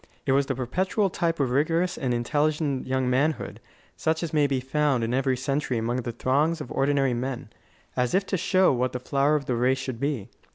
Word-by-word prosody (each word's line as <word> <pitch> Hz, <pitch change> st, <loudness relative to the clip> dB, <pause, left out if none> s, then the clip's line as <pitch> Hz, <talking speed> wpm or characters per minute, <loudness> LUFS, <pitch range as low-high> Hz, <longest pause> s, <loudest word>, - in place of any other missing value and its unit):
It 135 Hz, -, +1 dB
was 135 Hz, +1 st, +3 dB
the 135 Hz, -, -1 dB
perpetual 185 Hz, -, 0 dB
type 165 Hz, -1 st, -1 dB
of 135 Hz, -3 st, +1 dB
vigorous 165 Hz, +6 st, +1 dB
and 130 Hz, -2 st, -2 dB
intelligent 145 Hz, +3 st, 0 dB
young 130 Hz, 0 st, 0 dB
manhood, 140 Hz, +5 st, 0 dB, 0.4 s
such 160 Hz, +1 st, -1 dB
as 165 Hz, -, -4 dB
may 150 Hz, -2 st, +3 dB
be 135 Hz, -2 st, 0 dB
found 135 Hz, -1 st, +1 dB
in 115 Hz, +2 st, -1 dB
every 130 Hz, 0 st, +1 dB
century 135 Hz, 0 st, -1 dB
among 115 Hz, +2 st, -1 dB
the 120 Hz, -1 st, -3 dB
throngs 145 Hz, +7 st, +1 dB
of 150 Hz, -, -7 dB
ordinary 135 Hz, -2 st, +2 dB
men, 125 Hz, +1 st, -4 dB, 0.4 s
as 125 Hz, +5 st, +1 dB
if 195 Hz, +1 st, +2 dB
to 195 Hz, -, -1 dB
show 185 Hz, -1 st, +3 dB
what 125 Hz, 0 st, 0 dB
the 125 Hz, -, -3 dB
flower 140 Hz, +4 st, +1 dB
of 145 Hz, -2 st, -1 dB
the 125 Hz, -, -1 dB
race 125 Hz, +3 st, +2 dB
should 130 Hz, -3 st, -5 dB
be. 140 Hz, -7 st, -2 dB
135 Hz, 210 wpm, -26 LUFS, 125-150 Hz, 0.4 s, was